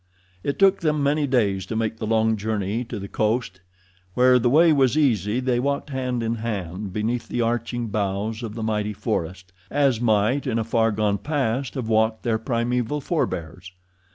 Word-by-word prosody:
It 140 Hz, -, -2 dB
took 195 Hz, 0 st, +4 dB
them 150 Hz, -3 st, 0 dB
many 145 Hz, +1 st, +1 dB
days 100 Hz, -8 st, +1 dB
to 110 Hz, -, -4 dB
make 110 Hz, 0 st, -1 dB
the 110 Hz, -, -4 dB
long 110 Hz, 0 st, +2 dB
journey 105 Hz, +1 st, -2 dB
to 115 Hz, -, -6 dB
the 100 Hz, 0 st, -6 dB
coast. 105 Hz, -4 st, -1 dB, 0.5 s
Where 125 Hz, 0 st, +5 dB
the 120 Hz, +1 st, +2 dB
way 160 Hz, +4 st, +5 dB
was 135 Hz, 0 st, +3 dB
easy 115 Hz, -, +2 dB
they 125 Hz, -2 st, 0 dB
walked 140 Hz, +2 st, -2 dB
hand 125 Hz, -3 st, -2 dB
in 115 Hz, +1 st, -1 dB
hand 100 Hz, -3 st, -4 dB
beneath 115 Hz, +4 st, -2 dB
the 120 Hz, -, -2 dB
arching 120 Hz, 0 st, -1 dB
boughs 105 Hz, +2 st, -2 dB
of 110 Hz, -2 st, -6 dB
the 115 Hz, -, -4 dB
mighty 105 Hz, -1 st, -1 dB
forest, 95 Hz, -4 st, -4 dB, 0.2 s
as 135 Hz, -5 st, +2 dB
might 110 Hz, +4 st, +2 dB
in 115 Hz, -3 st, 0 dB
a 115 Hz, -, 0 dB
far 115 Hz, 0 st, +1 dB
gone 105 Hz, -1 st, 0 dB
past 135 Hz, -1 st, -1 dB
have 125 Hz, -4 st, -3 dB
walked 110 Hz, 0 st, +1 dB
their 115 Hz, -2 st, 0 dB
primeval 120 Hz, +4 st, -1 dB
forbears. 90 Hz, -, -3 dB
115 Hz, 180 wpm, -23 LUFS, 105-125 Hz, 0.5 s, Where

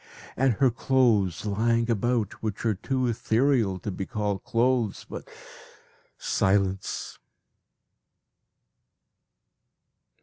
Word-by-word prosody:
And 130 Hz, -1 st, +3 dB
her 130 Hz, +3 st, +3 dB
clothes 115 Hz, -8 st, +2 dB
lying 115 Hz, +3 st, +1 dB
about 115 Hz, -1 st, 0 dB
which 110 Hz, 0 st, -4 dB
are 110 Hz, -, +3 dB
too 130 Hz, +6 st, -2 dB
ethereal 115 Hz, -3 st, +1 dB
to 105 Hz, -, -4 dB
be 95 Hz, +1 st, -5 dB
called 105 Hz, -5 st, -2 dB
clothes 120 Hz, -3 st, 0 dB
but -, -, -8 dB, 0.9 s
silence! 95 Hz, 0 st, -1 dB
115 Hz, 90 wpm, -26 LUFS, 100-125 Hz, 0.9 s, And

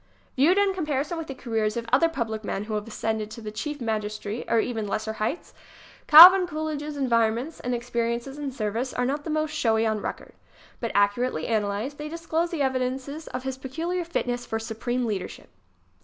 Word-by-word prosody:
Viewed 315 Hz, +9 st, +4 dB
in 400 Hz, -1 st, +3 dB
comparison 300 Hz, -3 st, -2 dB
with 325 Hz, -, -6 dB
the 270 Hz, -, -6 dB
careers 225 Hz, -3 st, -1 dB
of 235 Hz, -, -3 dB
other 330 Hz, +6 st, +5 dB
public 225 Hz, -8 st, -3 dB
men 200 Hz, -1 st, -3 dB
who 215 Hz, +1 st, -6 dB
have 210 Hz, +1 st, -3 dB
ascended 220 Hz, -1 st, -3 dB
to 225 Hz, -, -9 dB
the 215 Hz, -2 st, -6 dB
chief 295 Hz, +7 st, -5 dB
magis 215 Hz, -3 st, -2 dB
tracy 210 Hz, +3 st, -5 dB
or 230 Hz, -, +3 dB
to -, -, +1 dB
even 225 Hz, -4 st, -3 dB
lesser 220 Hz, +2 st, -2 dB
heights, 220 Hz, +9 st, -3 dB, 0.5 s
Calvin 360 Hz, +4 st, +11 dB
Coolidge' 310 Hz, -2 st, -3 dB
s 300 Hz, 0 st, -6 dB
environments 235 Hz, +2 st, +1 dB
and 245 Hz, 0 st, -2 dB
experiences 235 Hz, +3 st, -3 dB
in 285 Hz, -2 st, -3 dB
service 235 Hz, +1 st, -3 dB
are 250 Hz, -, 0 dB
not 290 Hz, +3 st, -2 dB
the -, -, -4 dB
most 310 Hz, 0 st, 0 dB
showy 225 Hz, -7 st, +1 dB
on 220 Hz, -1 st, 0 dB
record. -, -, -6 dB, 0.5 s
But, 230 Hz, -, -3 dB
accurately 205 Hz, -2 st, +1 dB
analyzed, 215 Hz, +5 st, -2 dB
they 300 Hz, 0 st, -5 dB
disclose 335 Hz, +1 st, -1 dB
the 325 Hz, -5 st, -1 dB
evidences 265 Hz, +3 st, -2 dB
of 255 Hz, 0 st, -5 dB
his 265 Hz, 0 st, -4 dB
peculiar 330 Hz, +7 st, -3 dB
fitness 245 Hz, -7 st, -2 dB
for 225 Hz, -, -3 dB
supreme 240 Hz, +2 st, -3 dB
leadership. 205 Hz, -5 st, -5 dB
250 Hz, 195 wpm, -25 LUFS, 220-300 Hz, 0.5 s, Calvin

